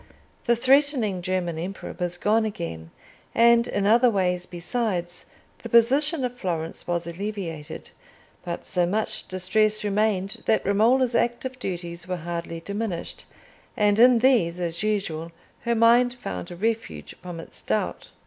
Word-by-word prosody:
The 235 - +4
threatening 260 -6 +2
German 175 -3 -2
Emperor 190 +4 -6
was 175 0 -2
gone 215 +4 +2
again; 80 - -5 0.5
and, 235 0 +5
in 200 -1 -1
other 235 +4 +5
ways 180 -4 0
besides, 175 -1 -3 0.3
the - - -7
position 270 +5 +3
of 250 0 -4
Florence 170 -7 -4
was 170 -1 -1
alleviated; 170 -4 -6 0.5
but 170 -1 -5
so 175 -2 +1
much 215 +3 -1
distress 215 +3 +1
remained 210 +1 0
that 220 - +2
Romola's 235 +6 +3
active 250 +2 -1
duties 175 -4 -5
were 185 - -2
hardly 170 0 -5
diminished, 200 -1 -4 0.5
and 210 -1 +3
in 245 +1 +7
these, 225 -9 +3
as 170 -1 -2
usual, 190 -6 -2 0.3
her 235 0 0
mind 240 +2 +4
found 90 - -6
a 175 - -8
refuge 225 +4 -3
from 175 -2 -7
its - - -9
doubt. - - -2
200 Hz, 140 wpm, -25 LUFS, 175-235 Hz, 0.5 s, in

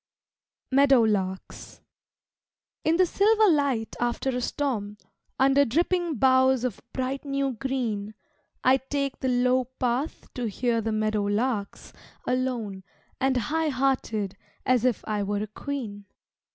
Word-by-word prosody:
Meadowlarks 220 -9 +2 1.0
In 325 +1 +2
the 370 - +5
silver 430 +4 +4
light 275 -8 0
after 240 +2 -1
a 250 0 -2
storm, 225 -7 -2 0.4
Under 270 +1 +5
dripping 340 +5 0
boughs 260 +1 +4
of 250 -5 -3
bright 260 +1 -3
new 275 -1 -1
green, 225 -5 -3 0.5
I 260 +1 +5
take 275 +1 -3
the 260 - -1
low 250 +1 +2
path 255 +3 -3
to 245 -2 -3
hear 230 +2 0
the 225 - -2
meadowlarks 215 +1 -1 0.3
Alone 245 -7 -2 0.4
and 265 -1 +2
high 310 +7 0
hearted 250 -7 0 0.3
as 255 -2 +3
if 250 -4 0
I 210 -1 -1
were 205 +1 -1
a - - -2
queen. 215 -3 -6
255 Hz, 125 wpm, -26 LUFS, 215-275 Hz, 1.0 s, the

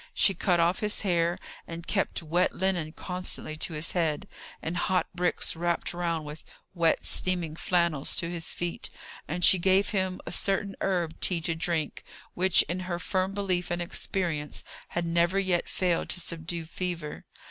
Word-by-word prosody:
She 195 - +5
cut 175 0 +2
off 170 +2 +3
his 210 -1 -1
hair, 175 -3 +2 0.3
and 170 0 -6
kept 195 -3 0
wet 175 +3 +2
linen 180 -4 +1
constantly 180 -3 -4
to 160 - -1
his 155 +1 -1
head; 160 -4 0 0.3
and 165 - -3
hot 185 +1 +2
bricks, 180 -1 +1
wrapped 170 +1 0
round 170 -3 -1
with 150 +2 -8 0.3
wet 170 -3 +2
steaming 175 -4 +1
flannels, 170 -5 +1
to 170 - 0
his 170 -1 -3
feet; 175 -1 -3 0.4
and 175 +3 +1
she 190 - +6
gave 190 +3 +4
him 190 -3 0
a - - -5
certain 195 0 +1
herb 175 -4 0
tea 180 -3 +3
to 165 +1 0
drink, 165 -1 -1 0.3
which, 185 0 +5
in 175 +4 -3
her 175 - 0
firm 190 +2 -1
belief 185 -3 0
and 175 - -1
experience, 170 -4 -3 0.2
had 175 0 -2
never 170 +2 +2
yet 185 -3 +1
failed 180 -3 0
to - - 0
subdue 170 0 -4
fever. 170 -2 -4
175 Hz, 170 wpm, -28 LUFS, 165-185 Hz, 0.4 s, she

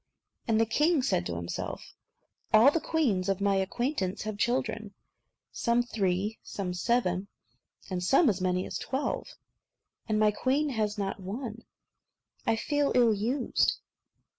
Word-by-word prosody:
And 220 -1 +3
the 225 - +4
king 295 +5 +2
said 85 - +1
to 85 - -3
himself, 85 0 -5 0.6
"All 225 +6 +7
the 330 - 0
queens 220 - +1
of 195 -1 +1
my 200 -1 +2
acquaintance 195 0 -1
have 215 0 -4
children, 220 -4 -1 0.6
some 235 +1 +1
three, 205 -2 -1
some 185 -3 -4
seven, 185 -1 0 0.6
and 180 -2 -3
some 275 - +4
as 195 -5 +1
many 185 0 0
as - - -4
twelve; 270 +2 -2 0.8
and 215 - +2
my 215 -1 +4
queen 270 +7 0
has 215 -5 -1
not 195 0 -3
one. 220 +4 -6 0.8
I 225 - +4
feel 290 +5 0
ill 240 -3 +5
used." 240 +6 +1
215 Hz, 140 wpm, -29 LUFS, 195-250 Hz, 0.8 s, All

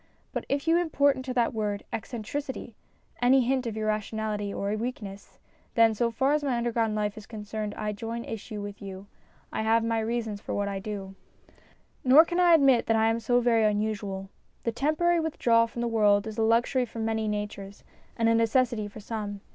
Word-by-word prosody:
But - - -4
if 280 +3 -1
you 330 +1 +5
import 285 -5 +3
into 260 0 -5
that 240 -2 +2
word, 210 -2 -2
eccentricity, 240 +2 -5 0.5
any 260 +2 +5
hint 255 0 0
of 220 -1 -4
irrationality 215 -1 -2
or 200 +1 -2
weakness, 215 -4 -6 0.4
then, 230 -1 +5
so 235 +2 +1
far 265 +5 +1
as 300 -1 +1
my 265 -4 0
underground 230 -2 0
life 210 -1 -1
is 215 - -14
concerned, 215 -1 -5
I 210 -1 -2
join 230 +3 -5
issue 215 -1 -6
with 205 0 -8
you. 195 -1 -8 0.5
I - - -1
have 225 +1 +3
my 230 0 0
reasons 220 -2 -2
for - - -4
what 205 0 -1
I 200 -1 -3
do. 195 -1 -6 0.9
Nor 275 +6 +8
can 345 +1 -2
I 350 -2 +7
admit 270 -6 +4
that 225 0 +3
I 220 0 +3
am 230 - -1
so 245 +1 +2
very 230 -2 +3
unusual. 205 -2 -1 0.3
The 230 - 0
temporary 310 +7 +1
withdrawal 235 -8 +2
from 235 +1 -5
the - - 0
world 210 -2 +3
is 220 0 -6
a - - +2
luxury 235 +3 +2
for 230 - -11
many 220 -1 -1
natures 205 -1 -5 0.3
and 230 -1 +2
a 230 - +4
necessity 230 -1 +2
for 210 +1 -11
some. 205 -2 -5
225 Hz, 195 wpm, -27 LUFS, 210-245 Hz, 0.9 s, Nor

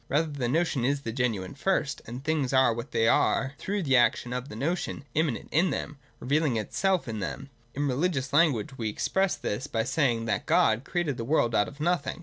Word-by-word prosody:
Rather 155 +2 +1
the 140 -4 -2
notion 155 -1 +1
is 140 +2 +1
the 115 - -4
genuine 115 -6 -1
first; 150 -1 -1
and 125 +3 -7
things 150 -4 0
are 130 -3 +5
what 115 +1 -6
they 115 - +1
are 135 +3 +2
through 200 0 -2
the 135 -4 +3
action 120 0 +2
of 125 +2 -4
the - - -8
notion, 145 +3 -2
immanent 155 -6 0
in 175 +4 +3
them, 140 - -3
and 145 - -17 0.2
revealing 145 -2 +1
itself 185 - 0
in 110 -2 -4
them. 135 +7 -5 0.2
In 145 +1 0
re 130 - 0
ligious 140 -3 -1
language 140 -4 +2
we 110 -2 -1
express 190 - 0
this 120 +8 -4
by 115 -4 -1
saying 120 -4 +1
that 115 - -2
God 110 +4 +3
created 170 -7 -1
the 115 - -3
world 120 -3 +1
out 105 -1 +3
of 140 - -11
nothing. 155 -2 -1
135 Hz, 215 wpm, -27 LUFS, 120-155 Hz, 0.2 s, are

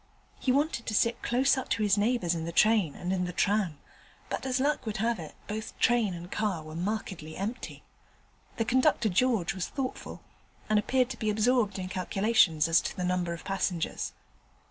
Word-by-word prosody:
He 255 - +1
wanted 280 -3 0
to 215 - -1
sit 230 +3 +2
close 260 +4 +3
up - - -7
to 220 - +1
his 205 -1 +4
neighbours 205 -4 +1
in 165 -1 -3
the 170 - -4
train 210 -4 +3
and 180 +1 -3
in 180 -1 0
the 180 - -4
tram, 195 -4 +1 0.5
but - - -3
as 255 0 0
luck 285 -2 0
would 215 - -2
have 225 0 0
it 160 -2 -8
both 215 +1 -5
train 230 -6 +2
and 175 +1 -9
car 200 -7 -1
were 155 0 -9
markedly 180 -4 -4
empty. 215 +6 -5 0.7
The 225 - 0
conductor 240 -2 +3
George 205 -2 +2
was 185 -1 -3
thoughtful, 265 -2 -5 0.4
and 215 -1 +3
appeared 255 +4 +1
to 245 - -6
be 215 - 0
absorbed 220 0 +2
in 185 -1 -4
calculations 185 -4 +2
as 165 0 +4
to - - -5
the 180 - -2
number 180 -1 0
of 170 - -8
passengers. 195 -3 -2
210 Hz, 190 wpm, -29 LUFS, 180-235 Hz, 0.7 s, his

